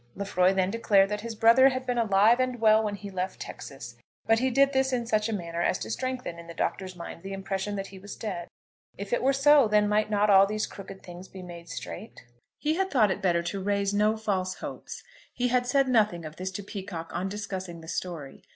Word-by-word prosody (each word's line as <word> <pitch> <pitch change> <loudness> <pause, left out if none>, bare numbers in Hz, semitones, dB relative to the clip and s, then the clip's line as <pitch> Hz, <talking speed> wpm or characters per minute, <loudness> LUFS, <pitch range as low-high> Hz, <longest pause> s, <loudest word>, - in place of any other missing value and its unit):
Lefroy 190 -2 +2
then 190 0 +1
declared 200 -3 +3
that 210 0 -3
his 230 0 -6
brother 230 +5 +6
had 255 0 -4
been 245 -1 0
alive 220 +2 +4
and 255 -1 0
well 220 -1 +5
when 210 -1 -2
he 200 0 -8
left 185 0 -3
Texas, 135 -3 -8 0.3
but 225 0 +3
he 260 +2 +1
did 275 +2 +3
this 265 0 +2
in 245 -2 -1
such 215 -1 +1
a - - -1
manner 170 -4 -3
as 185 - +1
to - - -6
strengthen 255 -9 -4
in 170 - -11
the 170 - -9
Doctor's 185 -1 -2
mind 170 -1 -8
the 195 +2 -6
impression 195 +1 -3
that 195 -1 -3
he 195 -1 -11
was 200 +2 -9
dead. 180 -6 -5 0.5
If 200 +3 -5
it - - +2
were 265 - +3
so, 275 -1 +5
then 210 0 +3
might 210 +1 +1
not 210 0 +2
all 195 -1 +7
these 215 +1 -1
crooked 195 -1 -10
things 180 +1 -10
be 190 -1 -10
made 170 -1 -10
straight? 225 - -8 0.3
He 310 +2 0
had 385 0 0
thought 220 - +3
it - - -3
better 170 -2 +2
to 195 +3 -4
raise 200 0 0
no 210 +2 +2
false 190 -4 -1
hopes. - - -8 0.3
He 250 0 0
had 245 0 +1
said 275 +1 +3
nothing 210 -9 +2
of 155 0 -9
this 185 +1 -3
to 205 - -5
Peacocke 190 -5 -7
on 180 +3 -2
discussing 190 -4 -6
the 160 - -12
story. 160 -4 -5
205 Hz, 235 wpm, -27 LUFS, 185-230 Hz, 0.5 s, all